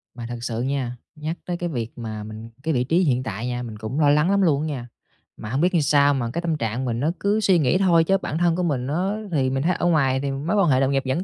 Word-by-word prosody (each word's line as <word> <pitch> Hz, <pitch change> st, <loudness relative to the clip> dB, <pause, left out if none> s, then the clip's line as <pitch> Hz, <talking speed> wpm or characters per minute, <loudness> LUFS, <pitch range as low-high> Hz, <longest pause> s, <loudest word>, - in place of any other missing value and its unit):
Mà 120 Hz, -, -7 dB
thật 120 Hz, -, -4 dB
sự 115 Hz, -1 st, -2 dB
nha, 130 Hz, -2 st, -2 dB, 0.2 s
nhắc 155 Hz, +3 st, -4 dB
tới 175 Hz, -1 st, -3 dB
cái 175 Hz, 0 st, -3 dB
việc 120 Hz, -7 st, -5 dB
mà 110 Hz, -2 st, -5 dB
mình 110 Hz, +1 st, -9 dB
cái 160 Hz, -1 st, 0 dB
vị 125 Hz, -, +1 dB
trí 160 Hz, +7 st, +2 dB
hiện 130 Hz, -5 st, +1 dB
tại 110 Hz, +2 st, -4 dB
nha, 125 Hz, 0 st, -3 dB
mình 110 Hz, -3 st, -7 dB
cũng 110 Hz, +7 st, -4 dB
lo 145 Hz, -2 st, +4 dB
lắng 150 Hz, +5 st, +3 dB
lắm 200 Hz, 0 st, +3 dB
luôn 150 Hz, -6 st, +3 dB
á 155 Hz, -, -2 dB
nha. 130 Hz, -5 st, -5 dB, 0.5 s
Mà 105 Hz, -, -7 dB
hổng 135 Hz, +5 st, 0 dB
biết 180 Hz, -, +4 dB
sao 145 Hz, 0 st, +4 dB
mà 120 Hz, -4 st, -1 dB
cái 170 Hz, -, -2 dB
tâm 165 Hz, -3 st, -1 dB
trạng 120 Hz, +1 st, -2 dB
mình 115 Hz, -1 st, -2 dB
nó 150 Hz, +5 st, +1 dB
cứ 205 Hz, +2 st, +1 dB
suy 190 Hz, -5 st, +3 dB
nghĩ 150 Hz, +3 st, +3 dB
thôi, 175 Hz, -4 st, +4 dB
chứ 195 Hz, +3 st, +2 dB
bản 155 Hz, -, -4 dB
thân 170 Hz, -1 st, +2 dB
của 180 Hz, -, -1 dB
mình 135 Hz, -7 st, -1 dB
nó 180 Hz, +8 st, -1 dB, 0.2 s
thì 135 Hz, -5 st, +1 dB
mình 135 Hz, +1 st, -1 dB
thấy 180 Hz, +2 st, +2 dB
ở -, -, -2 dB
ngoài 135 Hz, -6 st, +3 dB
thì 140 Hz, 0 st, -2 dB
mối 145 Hz, +8 st, -2 dB
quan 195 Hz, -6 st, +3 dB
hệ 130 Hz, -, +4 dB
đồng 135 Hz, 0 st, +2 dB
nghiệp 135 Hz, -1 st, +1 dB
vẫn 130 Hz, +7 st, -1 dB
140 Hz, 300 wpm, -23 LUFS, 125-170 Hz, 0.5 s, lo